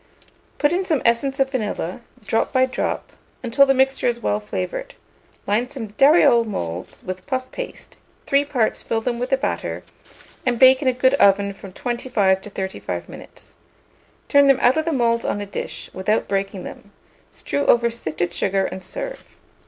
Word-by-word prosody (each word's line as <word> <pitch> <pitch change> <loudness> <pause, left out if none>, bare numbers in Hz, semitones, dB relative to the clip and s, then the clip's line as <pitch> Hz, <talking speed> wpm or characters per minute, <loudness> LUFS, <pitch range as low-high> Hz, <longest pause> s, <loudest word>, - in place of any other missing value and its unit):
Put 295 +2 +2
in 370 +2 +1
some 315 -7 0
essence 265 +4 +1
of 270 0 +2
vanilla, 210 -5 -3 0.2
drop 225 - 0
by 260 -1 +4
drop, 260 - -3 0.3
until 255 +3 +4
the 270 - +5
mixture 265 0 +2
is 240 -1 0
well 210 -2 0
flavoured; 210 - -5 0.5
line 230 +5 0
some 230 -7 -6
dariole 270 0 +5
moulds 90 - -5
with 185 0 -6
puff 260 -1 -3
paste, - - -8 0.3
three 280 +1 +3
parts 255 -6 0
fill 225 - -2
them 240 0 -2
with 250 +1 -2
the 270 - +3
batter, 270 - -3 0.6
and 245 -2 0
bake 260 +1 +7
in 275 - -1
a - - +5
good 260 +1 +2
oven 200 -5 +4
from 195 0 -11
25 220 -4 0
to 210 - -10
35 190 -1 -5
minutes. - - -13 0.7
Turn 285 -1 +5
them 275 -2 +5
out 250 0 +4
of 315 0 0
the 335 - 0
moulds 235 -4 +1
on - - -1
a 205 - -4
dish, 200 - -6
without 210 +4 0
breaking 195 -1 -2
them; 205 - -10 0.4
strew 285 - -3
over 235 0 +4
sifted 175 -6 -3
sugar, 195 0 0
and 185 0 -6
serve. - - -6
235 Hz, 175 wpm, -21 LUFS, 200-270 Hz, 0.7 s, bake